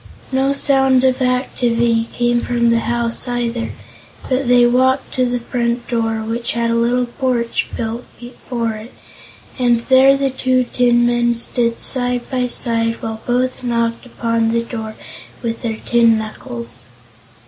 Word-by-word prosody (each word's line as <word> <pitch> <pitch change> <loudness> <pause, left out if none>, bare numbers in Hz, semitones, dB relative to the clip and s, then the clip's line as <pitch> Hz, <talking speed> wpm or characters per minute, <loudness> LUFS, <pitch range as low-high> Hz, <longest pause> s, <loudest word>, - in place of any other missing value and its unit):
No 265 +1 +2
sound 270 -2 +3
of 260 0 +2
activity 235 -2 +1
came 240 0 +1
from 235 -1 +1
the 230 - +3
house, 235 +1 -2
either, 240 -1 -2 0.6
but 260 0 0
they 245 0 +5
walked 260 +2 +2
to 255 -1 +1
the 245 0 -1
front 235 0 -2
door, 225 -2 -1
which 230 +2 -3
had 235 0 0
a - - +1
little 240 +2 +2
porch 240 -1 -1
built 230 +1 -4
before 240 -1 -4
it, 220 +2 -9 0.7
and 240 -2 +3
there 265 +1 +6
the 275 -1 0
two 255 -1 +1
tinmen 240 -1 +2
stood 235 0 +1
side 245 -2 -1
by 250 -1 0
side 230 -1 0
while 220 0 -4
both 255 +1 0
knocked 235 0 -1
upon 230 -1 0
the 230 0 +1
door 220 -2 -6 0.5
with 230 -1 -3
their 225 -2 -3
tin 230 -1 +3
knuckles. 120 - -7
240 Hz, 150 wpm, -18 LUFS, 230-250 Hz, 0.7 s, there